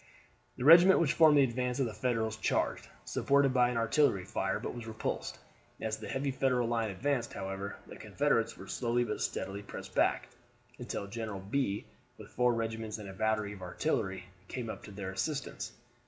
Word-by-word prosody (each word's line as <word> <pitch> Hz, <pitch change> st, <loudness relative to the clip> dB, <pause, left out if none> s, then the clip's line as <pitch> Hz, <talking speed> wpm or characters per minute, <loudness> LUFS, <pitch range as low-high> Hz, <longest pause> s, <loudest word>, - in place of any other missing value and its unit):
The 125 Hz, -, -3 dB
regiment 175 Hz, +5 st, +9 dB
which 160 Hz, -4 st, +2 dB
formed 155 Hz, -3 st, +6 dB
the 140 Hz, -, +7 dB
advance 125 Hz, +1 st, -1 dB
of 135 Hz, -, +3 dB
the 115 Hz, -, -4 dB
Federals 115 Hz, -3 st, -1 dB
charged, -, -, 0 dB, 0.2 s
supported 140 Hz, -1 st, +2 dB
by 125 Hz, -1 st, +4 dB
an 125 Hz, -, -2 dB
artillery 115 Hz, -4 st, +2 dB
fire, -, -, -1 dB
but -, -, -4 dB
was 120 Hz, -2 st, -7 dB
repulsed. 110 Hz, -1 st, -3 dB, 0.4 s
As 110 Hz, -1 st, -2 dB
the -, -, -7 dB
heavy 135 Hz, +1 st, -1 dB
Federal 125 Hz, -2 st, +1 dB
line 115 Hz, -2 st, 0 dB
advanced, 120 Hz, +5 st, -1 dB
however, 95 Hz, +1 st, -4 dB
the -, -, -11 dB
Confederates 115 Hz, -6 st, 0 dB
were -, -, -9 dB
slowly 120 Hz, 0 st, 0 dB
but 110 Hz, -3 st, -3 dB
steadily 100 Hz, +1 st, -3 dB
pressed 100 Hz, -, -9 dB
back, -, -, +2 dB, 0.5 s
until -, -, -4 dB
General 105 Hz, -1 st, -5 dB
Bee, 100 Hz, +1 st, -1 dB, 0.3 s
with -, -, -12 dB
four 125 Hz, -1 st, +2 dB
regiments 115 Hz, -1 st, -3 dB
and 105 Hz, -2 st, -8 dB
a -, -, -8 dB
battery 105 Hz, 0 st, 0 dB
of 100 Hz, -, -11 dB
artillery, 95 Hz, -, -2 dB, 0.2 s
came 120 Hz, 0 st, -4 dB
up -, -, -9 dB
to -, -, -10 dB
their 95 Hz, -1 st, -5 dB
assistance. 140 Hz, +10 st, -3 dB
115 Hz, 185 wpm, -32 LUFS, 105-130 Hz, 0.5 s, regiment